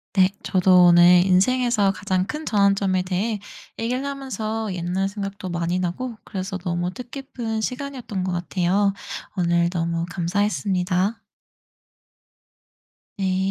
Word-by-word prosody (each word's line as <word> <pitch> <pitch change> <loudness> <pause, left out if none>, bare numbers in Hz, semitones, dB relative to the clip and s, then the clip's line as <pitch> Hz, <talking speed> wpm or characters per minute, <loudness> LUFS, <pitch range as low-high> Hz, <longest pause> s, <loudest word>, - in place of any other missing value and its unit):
네. 190 -1 +5
저도 185 -1 +5
오늘 175 +1 +7
인생에서 210 +2 +3
가장 190 -1 -1
큰 305 +1 -5
전환점에 200 -2 +2
대해 195 +4 -1 0.4
얘기를 250 +4 -1
하면서 225 -6 -3
옛날 180 +2 -1
생각도 195 -2 -5
많이 170 +1 -1
나고 215 +7 -3
그래서 190 -1 -5
너무 175 0 -2
뜻깊은 240 -1 -5
시간이었던 250 -6 -4
것 185 - -2
같아요. 180 +3 +1 0.4
오늘 170 -2 +2
너무 170 -1 -1
감사했습니다. 185 +2 0 2.0
네. 190 -1 +1
190 Hz, 270 characters per minute, -23 LUFS, 180-220 Hz, 2.0 s, 오늘